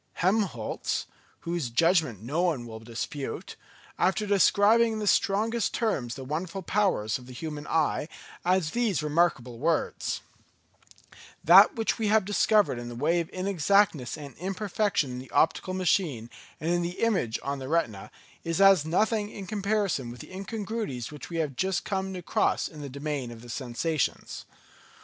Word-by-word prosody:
Helmholtz, 185 - -1 0.4
whose 170 -6 -2
judgment 155 - +2
no 145 +9 -1
one 160 -9 0
will 110 -1 -8
dispute, 120 +5 -5 0.4
after 200 +3 +2
describing 205 +3 +4
in - - -3
the 215 - -3
strongest 215 +3 +1
terms 140 - -1
the 135 - -7
wonderful 170 +7 -4
powers 170 - +1
of 125 - -14
the 130 - -10
human 150 +2 -6
eye, 155 -1 +1 0.4
adds 180 -3 +2
these 225 - 0
remarkable 145 -7 +1
words: 165 +4 -1 1.2
"That - - +8
which 225 0 -1
we 220 - 0
have 215 -1 +3
discovered 205 - +3
in 120 0 -6
the 120 - -7
way 160 +8 +1
of 165 - -3
inexactness 185 -6 +1
and 140 -4 -9
imperfection 195 -4 -1
in 125 - -5
the 130 - -10
optical 185 +3 +1
machine 160 - 0 0.3
and 165 +2 -1
in 175 0 +2
the 175 +1 -4
image 190 - +1
on 140 0 -3
the 130 - -6
retina, 135 -12 -1 0.3
is 165 +2 -2
as 195 -5 +7
nothing 210 +6 +1
in 200 -2 -8
comparison 200 - -1
with 120 0 -9
the - - -12
incongruities 200 - -4
which 150 - -9
we 170 - -4
have 150 -5 -1
just 190 +5 -1
come 190 -1 -2
across 180 -2 0
in 155 -2 -10
the 140 - -6
domain 140 -2 -4
of 115 -1 -11
the 120 - -12
sensations. 130 +5 -2
170 Hz, 160 wpm, -27 LUFS, 135-200 Hz, 1.2 s, That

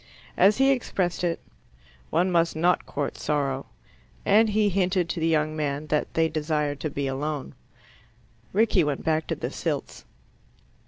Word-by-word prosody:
As 200 +3 +5
he 270 +1 +5
expressed 190 -9 -1
it, 170 -1 0 0.7
"one 180 +3 +2
must 170 -2 +2
not 175 +3 +2
court 145 0 -3
sorrow," 140 -3 -1 0.6
and 215 +2 +5
he 210 0 +2
hinted 185 -2 +1
to 170 - -2
the 165 - +1
young 155 -1 +1
man 145 -1 -2
that 150 - 0
they 165 0 +3
desired 150 -2 -1
to 155 - -2
be 140 0 -3
alone. 140 +1 -3 1.0
Rickie 205 -3 +3
went 145 -2 -2
back 160 -1 0
to - - -1
the - - -4
Silts. - - -4
160 Hz, 155 wpm, -26 LUFS, 150-185 Hz, 1.0 s, As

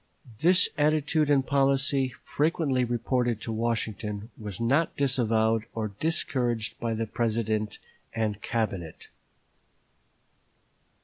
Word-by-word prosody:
This 180 +2 +5
attitude 150 0 +2
and 140 -2 +3
policy, 135 -1 +2
frequently 150 -4 +1
reported 120 -1 0
to 115 - -3
Washington, 110 -1 -2
was 105 -4 -7
not 140 +8 +1
disavowed 115 -5 +2
or 110 -1 -2
discouraged 120 -8 -1
by 115 -1 -1
the 115 +1 -1
President 110 -1 -1 0.3
and 110 -2 -2
Cabinet. 95 -8 -3
120 Hz, 100 wpm, -27 LUFS, 110-140 Hz, 0.3 s, This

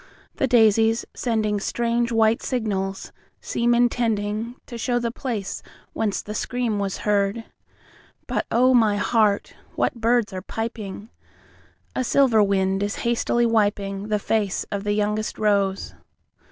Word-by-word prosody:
The 270 - +1
daisies, 225 -1 +4
sendingStrange 235 +1 0
white 225 0 +3
signals, 195 -6 -3 0.3
seem 240 0 0
intendingTo 230 -1 -1
show 240 +1 0
the 235 -1 -1
place 230 -6 -4 0.3
whence 210 -3 -1
the 210 - -6
scream 235 -1 -2
was 195 -2 -2
heard. 205 +2 +1 0.8
But, - - -2
oh, 255 +2 +4
my 220 -4 +4
heart, 210 -1 +1 0.2
what - - +1
birds 230 -2 +2
are 185 - -4
piping!A 220 +3 -8
silver 250 -3 +4
wind 195 -1 +1
is 205 0 -1
hastily 235 0 +1
wipingThe 205 -2 0
face 205 -2 -1
of 200 0 -3
the 205 - +1
youngest 210 +1 -1
rose. 200 -2 0
215 Hz, 120 wpm, -23 LUFS, 205-235 Hz, 0.8 s, daisies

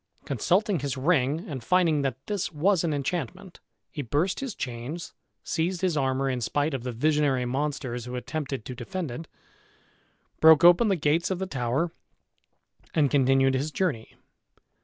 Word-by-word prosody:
Consulting 180 - +1
his 140 -1 -3
ring, 145 +1 +1
and 135 -6 -6
finding 170 -2 +3
that 135 -2 -1
this 205 -4 -2
was 175 +4 +2
an 165 - 0
enchantment, 175 +5 -4 0.3
he 155 - -4
burst 145 +8 0
his 265 -6 -4
chains, 125 +7 -5 0.3
seized 175 +2 -1
his 185 -4 +1
armor 135 -1 0
in 130 -2 -1
spite 145 +6 0
of 135 - -2
the 125 +1 -4
visionary 140 0 +1
monsters 130 -2 -3
who 125 0 -6
attempted 135 -2 -4
to 125 - -6
defend 180 +3 -5
it, 155 +7 -7 1.1
broke 160 -1 +7
open 175 +6 +7
the 195 - +3
gates 160 +1 +1
of 190 - -1
the 190 - -2
tower, 135 +1 -1 1.0
and 145 -4 +3
continued 135 -1 +3
his 135 +4 -1
journey. 150 -9 -2
145 Hz, 160 wpm, -26 LUFS, 130-175 Hz, 1.1 s, broke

